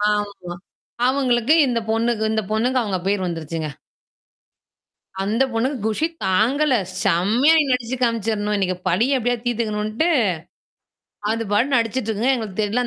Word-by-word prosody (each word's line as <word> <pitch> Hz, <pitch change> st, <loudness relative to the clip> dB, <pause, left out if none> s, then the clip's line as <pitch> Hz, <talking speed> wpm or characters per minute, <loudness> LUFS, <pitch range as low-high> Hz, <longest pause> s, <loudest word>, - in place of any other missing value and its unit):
ஆமா. 200 Hz, -4 st, -5 dB, 0.5 s
அவங்களுக்கு 255 Hz, 0 st, +2 dB
இந்த 240 Hz, -2 st, 0 dB
பொண்ணுக்கு 225 Hz, 0 st, 0 dB
இந்த 220 Hz, -, +1 dB
பொண்ணுக்கு 245 Hz, +4 st, +1 dB
அவங்க 195 Hz, -4 st, -2 dB
பேர் 195 Hz, -1 st, 0 dB
வந்துருச்சுங்க. 165 Hz, -2 st, -4 dB, 1.5 s
அந்த 215 Hz, +6 st, +1 dB
பொண்ணுக்கு 250 Hz, +4 st, -1 dB
குஷி 220 Hz, +8 st, 0 dB, 0.2 s
தாங்கல. 255 Hz, +10 st, +2 dB, 0.3 s
செம்மையா 225 Hz, -, +3 dB
நடிச்சு 250 Hz, 0 st, -1 dB
காமிச்சுரணும். 220 Hz, -3 st, 0 dB
இன்னைக்கு 185 Hz, -2 st, -1 dB
பலிய 245 Hz, +10 st, +2 dB
எப்டியாது 245 Hz, 0 st, -1 dB
தீர்த்தக்கணுன்ட்டு, 220 Hz, +4 st, -1 dB, 1.2 s
அது 230 Hz, 0 st, -2 dB
பாட்டு 260 Hz, +6 st, +2 dB
நடிச்சுட்டு 230 Hz, 0 st, -1 dB
இருக்குங்க. 230 Hz, +5 st, +1 dB
எங்களுக்கு 220 Hz, -4 st, -4 dB
தெர்ல 230 Hz, +4 st, 0 dB
225 Hz, 120 wpm, -21 LUFS, 205-250 Hz, 1.5 s, செம்மையா